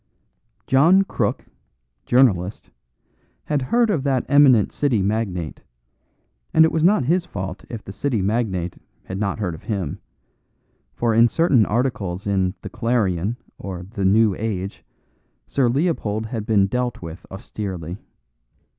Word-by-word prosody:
John 165 +9 +5
Crook, - - -2 0.6
journalist, 105 -7 +2 0.7
had 145 -2 -1
heard 230 - +2
of 165 -9 0
that 135 -2 0
eminent 140 -7 +5
City 135 -7 +1
magnate; 95 -6 -2 0.9
and 160 0 +8
it 160 - +1
was 160 -1 0
not 190 -2 +4
his 175 +5 +2
fault 95 - -6
if 115 -3 -7
the 95 - -9
City 125 0 -1
magnate 95 -4 -1 0.2
had 95 +1 -6
not 100 -2 -1
heard 95 -6 -2
of 80 - -10
him; 100 -9 -3 1.0
for 120 -1 +1
in 115 +2 +6
certain 135 -5 +3
articles 105 -6 -1
in 95 -1 0
The - - -6
Clarion 110 -3 0 0.2
or 95 -3 -6
The 100 -4 -3
New 105 +2 +4
Age 100 -1 -4 0.6
Sir 130 -4 +1
Leopold 120 - 0
had 110 -2 -5
been 105 -3 +4
dealt 125 0 -2
with 85 +2 -8
austerely. 95 -2 -6
110 Hz, 135 wpm, -22 LUFS, 95-130 Hz, 1.0 s, and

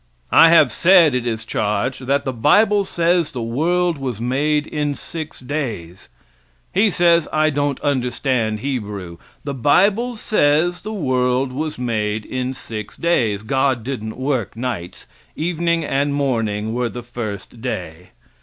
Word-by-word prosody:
I 165 - +8
have 155 -6 +6
said, 170 0 +5
it 125 -1 -1
is 110 -1 -3
charged, 125 +5 -2
that 140 +1 +1
the 130 - -2
bible 200 - +3
says 170 -3 +1
the 125 - -4
world 165 +7 0
was 125 -5 -4
made 145 +5 0
in 145 -2 -2
six 160 +1 -7
days. 120 - -5 0.6
He 210 +3 +4
says 170 -3 +3
I 155 0 +2
don't 145 -1 -1
understand 125 -5 0
Hebrew. 105 -10 -4 0.3
The 140 - -4
bible 200 - +2
says 175 -4 +1
the 215 - -6
world 130 -7 0
was 155 +3 -3
made 110 -3 -2
in 130 0 -3
six 110 -4 -7
days. 115 -12 +1
God 130 0 0
didn't 110 -4 -5
work 130 -7 -2
nights 115 -8 -5 0.3
evening 170 0 0
and 140 +1 0
morning 110 -6 -1
were 120 0 -1
the 120 0 -7
first 115 -2 -7
day. 90 -8 -5
130 Hz, 145 wpm, -20 LUFS, 115-155 Hz, 0.6 s, I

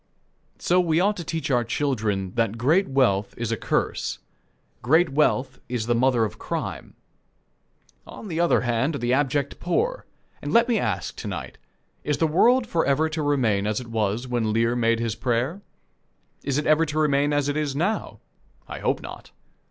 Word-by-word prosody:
So 180 +1 +2
we 165 -2 +2
ought 205 +3 +2
to 175 - -4
teach 160 -2 -3
our 120 -2 +3
children 110 -7 -1
that 115 -2 0
great 160 +11 +3
wealth 105 -7 +1
is 115 -1 -3
a - - +1
curse. - - -1 0.6
Great 160 +8 +3
wealth 135 -2 +1
is 120 -3 -2
the 120 - +1
mother 120 -1 +3
of 105 - -7
crime. - - -5 1.1
On 220 - -9
the 165 -3 -3
other 170 0 +3
hand 125 +5 0
are - - -1
the 120 -1 0
abject 140 0 0
poor. 485 - -1 0.3
And - - -4
let 235 +1 +5
me 235 -4 +2
ask, 100 -6 -2
to - - -6
night: - - -6 0.4
Is 150 -1 0
the 160 - +2
world 235 +11 +4
forever 160 -6 +1
to 155 0 -3
remain 120 -9 +1
as 105 0 0
it 120 -2 -9
was 110 +2 -1
when 120 -3 0
Lear 115 +2 +1
made 115 -1 +2
his 115 -2 -1
prayer? 125 - -1 0.8
Is 140 0 -1
it 150 - -1
ever 155 +1 +4
to 150 +1 -4
remain 145 -1 +2
as 145 -1 +1
it 145 - -1
is 150 -3 -1
now? 185 +9 -2 0.5
I - - -7
hope - - -1
not. - - -9
135 Hz, 185 wpm, -24 LUFS, 115-160 Hz, 1.1 s, let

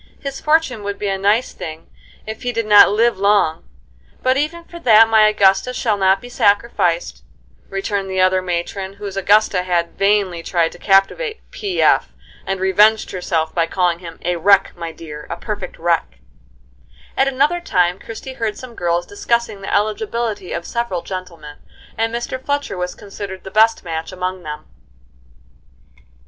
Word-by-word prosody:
His 275 -1 -6
fortune 305 -7 +1
would 200 0 -4
be 205 - -2
a 195 - 0
nice 210 +6 +1
thing 160 0 -8 0.4
if 220 0 -7
he 245 - -2
did 230 -1 -2
not 210 -1 +8
live 225 +1 +2
long; 200 -5 +2 0.5
but 255 0 +3
even 310 +5 -2
for 340 0 -11
that 225 -7 +6
my 220 -1 +5
Augusta 205 +4 +3
shall 220 -4 +1
not 190 -1 +3
be 245 - -10
sacrificed," 200 - 0 0.5
returned 195 0 -3
the 190 0 -2
other 185 0 +3
matron 185 +2 -4
whose 200 -1 -7
Augusta 200 -1 +3
had 175 -2 -2
vainly 195 -4 +2
tried 165 -1 0
to 175 - -14
captivate 210 - +2
"P. 390 -3 -2
F.," - - +3 0.3
and 195 0 -2
revenged 210 +4 +3
herself 165 -3 -2
by 165 -1 +1
calling 175 -1 0
him 165 -2 -10
"a 175 0 0
wreck, 195 +3 +3
my 170 -1 -6
dear, 150 -2 -10
a 170 - -4
perfect 210 +3 -6
wreck." 165 - -1 1.0
At 270 - +2
another 275 +6 +1
time 180 - +1
Christie 230 +4 -8
heard 215 -2 -1
some 255 -2 -10
girls 175 -3 -1
discussing 225 0 -2
the 195 - -5
eligibility 215 -1 -1
of 170 - -4
several 235 -7 -3
gentlemen, 170 -6 -8 0.4
and 225 0 0
Mr. 240 +2 -4
Fletcher 285 -6 -2
was 180 0 -4
considered 195 -1 -8
the 190 - -9
best 220 +1 +3
match 165 -1 -5
among 185 0 -4
them. 150 -2 -7
195 Hz, 165 wpm, -19 LUFS, 180-225 Hz, 1.0 s, not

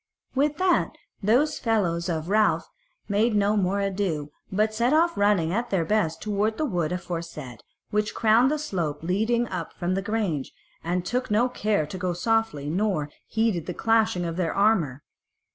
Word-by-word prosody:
With 285 +2 +1
that 370 -1 +2 0.3
those 245 +9 +2
fellows 185 -7 0
of 160 -1 -2
Ralph 215 +2 +2 0.4
made 215 +2 +2
no 205 +1 +3
more 200 0 +1
ado, 190 -7 -2 0.2
but 215 +3 +1
set 235 +5 +2
off 335 +2 +3
running 200 -5 +2
at 235 +3 -1
their 180 -4 +1
best 165 -5 0
toward 210 +1 0
the 310 - 0
wood 175 - -1
aforesaid, 165 - -5 0.3
which 210 0 0
crowned 230 +3 +4
the 305 - 0
slope 170 - -3
leading 220 +7 +1
up - - -5
from 175 +1 -2
the 195 - 0
grange, 200 -9 -2 0.3
and 175 +2 -1
now - - -22
took 250 +1 -1
no 215 +4 +3
care 210 -9 0
to 165 +5 -7
go 180 -1 -1
softly, 180 -6 0
nor 175 -3 0 0.2
heeded 220 -7 0
the 180 - -4
clashing 220 -6 +2
of 165 0 -4
their 175 -3 -1
armour. 175 - +2
200 Hz, 175 wpm, -25 LUFS, 170-225 Hz, 0.4 s, crowned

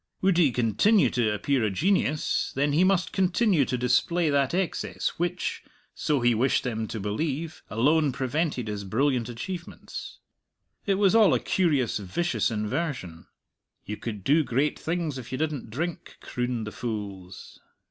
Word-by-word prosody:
Would 190 -2 +4
he 150 -6 +5
continue 125 - +3
to 115 -3 +1
appear 125 +4 0
a 110 - +2
genius, 155 - +1
then 145 +2 +1
he 165 +5 +4
must 185 -2 +2
continue 185 - +2
to 125 - -2
display 150 +7 +2
that 140 -2 +2
excess 185 0 -1
which 175 +1 -2 0.3
so 145 -4 0
he 120 0 +4
wished 125 +4 +2
them 110 -3 -2
to 110 - -5
believe 145 +10 -3
alone 145 +6 +3
prevented 130 -1 -1
his 105 -1 -4
brilliant 125 +4 0
achievements. 170 +9 -7 0.7
It 195 - +3
was 195 0 +3
all 220 -3 +6
a - - +1
curious, 145 - +1
vicious 110 - -1
inversion. 105 - -3 0.6
"You 105 - -4
could 105 -3 -6
do 155 - +4
great 135 +3 0
things 160 -5 -2
if 120 -1 -10
you 130 - -2
didn't 150 -6 -2
drink," 160 +9 -5
crooned 125 -2 -3
the 105 - -6
fools. 100 -6 -6
135 Hz, 155 wpm, -26 LUFS, 115-170 Hz, 0.7 s, all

